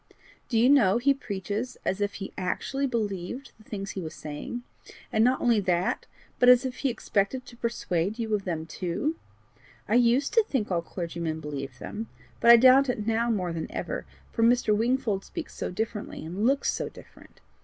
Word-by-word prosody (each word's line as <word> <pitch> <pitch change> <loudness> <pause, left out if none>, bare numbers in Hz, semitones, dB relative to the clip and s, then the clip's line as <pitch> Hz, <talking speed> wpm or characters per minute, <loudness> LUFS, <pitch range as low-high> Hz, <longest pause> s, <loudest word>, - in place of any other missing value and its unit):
Do 230 - +1
you 235 +2 +5
know 235 -8 +5
he 275 +4 +4
preaches 210 0 -4
as 190 +2 -1
if 205 0 -1
he 195 - -6
actually 270 +9 -1
believed 220 +1 -3
the - - -17
things 195 -2 -5
he 190 - -5
was 160 -2 -6
saying, 155 +11 -6 0.5
and 220 - +4
not 255 +2 +3
only 235 -3 +3
that, 180 -2 0 0.3
but 245 - +6
as 250 +1 +7
if 255 -1 -4
he 275 - 0
expected 235 +1 -1
to 240 - -12
persuade 215 -5 -1
you 225 -2 -2
of 205 -2 +1
them 165 -4 -3
too! 180 - -2 0.7
I - - 0
USED 245 +3 +3
to 455 - +5
think 260 - -2
all 170 -2 +1
clergymen 170 -2 -4
believed 140 -4 -6
them, 220 +2 -6 0.3
but 235 - +4
I 235 - +11
doubt 260 +3 +6
it 215 -4 -1
now 225 +1 +1
more 185 -6 0
than 165 -1 -4
ever, - - -4 0.2
for - - -2
Mr. 230 -2 +4
Wingfold 230 -3 0
speaks 335 -3 -7
so - - -4
differently 210 -1 -4
and 190 +8 -1
looks 275 +1 +2
so - - -3
different. - - -16
220 Hz, 190 wpm, -27 LUFS, 185-245 Hz, 0.7 s, I